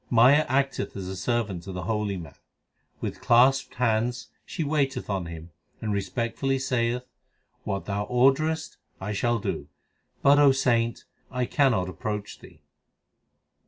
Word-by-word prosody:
Maya 130 Hz, +6 st, +5 dB
acteth 135 Hz, -4 st, 0 dB
as 95 Hz, -2 st, -5 dB
a 95 Hz, -, -5 dB
servant 100 Hz, -2 st, -1 dB
to 95 Hz, +2 st, -8 dB
the 90 Hz, -1 st, -5 dB
holy 105 Hz, 0 st, -1 dB
man. 80 Hz, -5 st, -9 dB, 0.7 s
With -, -, -4 dB
clasped 130 Hz, +2 st, +4 dB
hands 120 Hz, +1 st, 0 dB, 0.2 s
she 165 Hz, -, -3 dB
waiteth 140 Hz, -6 st, -1 dB
on 95 Hz, -3 st, -2 dB
him 85 Hz, 0 st, -9 dB, 0.3 s
and 105 Hz, -1 st, -2 dB
respectfully 120 Hz, +6 st, -1 dB
saith, 125 Hz, -1 st, -1 dB, 0.6 s
What 100 Hz, -2 st, -3 dB
thou 100 Hz, 0 st, -2 dB
orderest 135 Hz, +7 st, +2 dB, 0.2 s
I 105 Hz, +2 st, -4 dB
shall 120 Hz, +3 st, +1 dB
do; 100 Hz, -, -4 dB, 0.6 s
But, 140 Hz, +1 st, +6 dB
O 140 Hz, -2 st, +7 dB
saint, 120 Hz, -3 st, +1 dB, 0.2 s
I 125 Hz, -1 st, -1 dB
cannot 125 Hz, -10 st, +2 dB
approach 105 Hz, +3 st, -5 dB
thee. -, -, -16 dB
120 Hz, 140 wpm, -26 LUFS, 100-135 Hz, 0.7 s, O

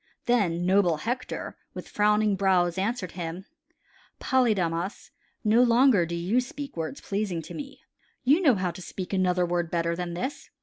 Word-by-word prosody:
Then 180 Hz, -8 st, +1 dB
noble 185 Hz, -3 st, +3 dB
Hector 245 Hz, +9 st, -4 dB, 0.2 s
with -, -, -7 dB
frowning 210 Hz, 0 st, +2 dB
brows 180 Hz, -3 st, +2 dB
answered 200 Hz, -2 st, -2 dB
him: 175 Hz, +1 st, -6 dB, 0.7 s
"Polydamas, 195 Hz, -, 0 dB, 0.3 s
no 220 Hz, +2 st, +4 dB
longer 235 Hz, -6 st, +5 dB
do 170 Hz, -, -3 dB
you 180 Hz, +8 st, +1 dB
speak 280 Hz, +2 st, -7 dB
words 165 Hz, -, -4 dB
pleasing 195 Hz, -5 st, -2 dB
to 155 Hz, -, -9 dB
me. 280 Hz, -2 st, -8 dB, 0.4 s
You 285 Hz, +8 st, +4 dB
know 280 Hz, -9 st, +5 dB
how 185 Hz, -2 st, -1 dB
to 180 Hz, +2 st, -10 dB
speak 185 Hz, +1 st, -6 dB
another 180 Hz, -1 st, +2 dB
word 175 Hz, -1 st, -1 dB
better 170 Hz, 0 st, 0 dB
than 175 Hz, -1 st, -4 dB
this. 260 Hz, +11 st, -5 dB
190 Hz, 160 wpm, -27 LUFS, 175-235 Hz, 0.7 s, longer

